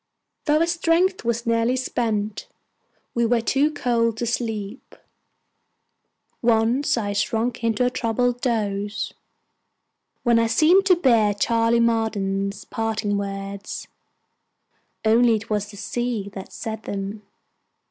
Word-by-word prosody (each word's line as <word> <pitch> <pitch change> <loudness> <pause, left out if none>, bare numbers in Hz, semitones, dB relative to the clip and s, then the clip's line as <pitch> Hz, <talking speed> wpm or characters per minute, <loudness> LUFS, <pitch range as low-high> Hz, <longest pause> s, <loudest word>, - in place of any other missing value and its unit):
Though 305 +1 +3
our - - +4
strength 340 +2 +1
was 235 0 -1
nearly 230 +2 +2
spent, 220 -5 -2 0.7
we 235 - +1
were 235 +1 +3
too 275 +6 +2
cold 235 -6 0
to 235 - -2
sleep. 225 -1 -4 1.5
Once 235 +3 +2
I 205 -3 -1
sunk 225 +4 -1
into 230 +1 +2
a 250 - +1
troubled 245 +1 0
doze, 210 -4 -1 1.1
when 235 -2 +4
I 230 - +2
seemed 325 +12 +4
to 365 - +6
bear 230 - +3
Charley 230 +2 +2
Marden's 200 -4 0
parting 220 -2 -2
words, 200 0 -5 1.2
only 230 +1 +5
it 220 +1 -6
was 210 -1 -1
the 205 - -11
Sea 225 -2 -3
that 190 -1 -8
said 220 -1 -5
them. 200 0 -5
230 Hz, 120 wpm, -23 LUFS, 210-245 Hz, 1.5 s, to